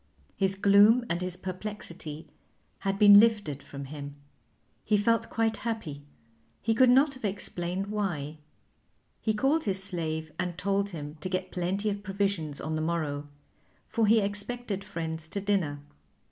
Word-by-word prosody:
His 195 0 +1
gloom 205 +5 +6
and 170 +1 -1
his 180 -1 -3
perplexity 180 -5 -5 0.5
had 195 0 -1
been 205 -1 +9
lifted 205 -11 +2
from 140 0 -8
him; 145 0 -7 0.7
he 215 - +3
felt 230 +3 +2
quite 225 -1 0
happy; 220 -12 -4 0.6
he 225 - +1
could 255 +2 +5
not 275 +3 +5
have 260 - -12
explained 190 -2 -2
why. 175 -8 -3 0.8
He 220 -1 0
called 275 +8 +2
his 190 -1 +1
slave 160 -4 -3
and 180 -2 -2
told 200 +1 0
him 150 -4 -7
to 185 - -3
get 185 0 -2
plenty 185 +4 -1
of 200 0 -4
provisions 195 -7 -1
on 155 +1 -3
the 155 - -1
morrow, 155 -3 -2 0.6
for 225 -2 +1
he 225 +2 +6
expected 205 +1 -3
friends 160 -5 -5
to 200 - -4
dinner. 190 -8 0
195 Hz, 150 wpm, -29 LUFS, 160-210 Hz, 0.8 s, been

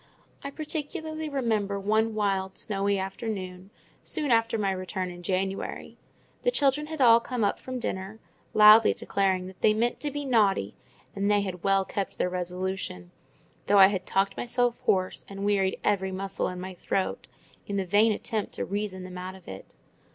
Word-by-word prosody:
I 280 - -4
particularly 310 +1 -4
remember 220 -7 -1
one 220 +2 +1
wild, 195 -2 -1
snowy 200 -1 0
afternoon, 190 -1 -5 0.3
soon 300 -5 +1
after 225 0 +3
my 200 -2 0
return 185 -1 -4
in 175 0 -10
January: 190 +2 -3 0.5
the - - +2
children 295 - +1
had 315 -2 -5
all 230 -2 +7
come 240 -1 -3
up 200 - +1
from 255 0 -6
dinner, 195 -3 -4 0.4
loudly 215 +1 +8
declaring 190 -2 0
that 185 0 -12
they 215 - +4
meant 235 +2 0
"to 295 - -2
be 290 0 -4
naughty;" 205 - +2 0.4
and 200 +1 0
they 205 0 +4
had 185 -3 -5
well 195 -1 +3
kept 195 0 -4
their 180 - 0
resolution, 180 - -4 0.6
though 205 - +4
I 190 -1 +9
had 190 -2 -3
talked 195 +1 +1
myself 245 0 0
hoarse, 185 -1 +1
and 195 0 -5
wearied 195 -2 +1
every 190 -2 +1
muscle 195 +1 -1
in 180 0 -5
my 185 +1 -6
throat, 185 +1 -2 0.4
in 200 - -3
the 195 -1 0
vain 210 +5 +4
attempt 215 0 -3
to - - -3
reason 200 -2 -4
them 180 0 -8
out 185 +1 -6
of 190 - -16
it. 95 - -10
200 Hz, 175 wpm, -27 LUFS, 190-225 Hz, 0.6 s, I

